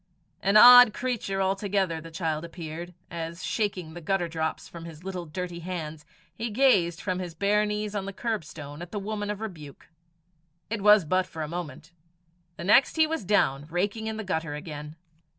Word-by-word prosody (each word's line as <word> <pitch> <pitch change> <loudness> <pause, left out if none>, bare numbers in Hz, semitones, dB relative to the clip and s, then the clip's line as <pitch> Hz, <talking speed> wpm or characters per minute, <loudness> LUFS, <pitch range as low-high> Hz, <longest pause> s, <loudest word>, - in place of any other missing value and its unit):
An 200 +2 +4
odd 245 -1 +10
creature 220 -6 -2
altogether 190 -3 0
the 165 - -10
child 160 -2 -2
appeared, 170 +1 -7 0.2
as, 170 +1 -5
shaking 190 -7 -2
the 175 - -8
gutter 175 +1 0
drops 160 -1 -3
from 170 -1 -10
his 165 0 -11
little 185 -3 -5
dirty 175 +2 -5
hands, 160 -3 -6 0.3
he 230 +1 -4
gazed 205 -8 +3
from 185 -2 -2
his 175 -3 -6
bare 210 +3 +2
knees 210 0 -3
on 200 -2 -3
the 200 - -4
curbstone 160 -9 -5
at 175 - -7
the 210 - -4
woman 205 +1 -3
of 210 0 -4
rebuke. 155 -10 -9 0.8
It 225 -3 -2
was 210 -3 +6
but 185 +4 +1
for 160 -2 -6
a - - -4
moment. 165 -2 -7 0.7
The - - -6
next 215 +8 +5
he 315 -1 +5
was 320 -5 -3
down, 150 -8 +1
raking 200 +6 -1
in 220 0 -3
the 220 - -4
gutter 160 -6 -2
again. 150 0 -7
180 Hz, 185 wpm, -27 LUFS, 160-210 Hz, 0.8 s, odd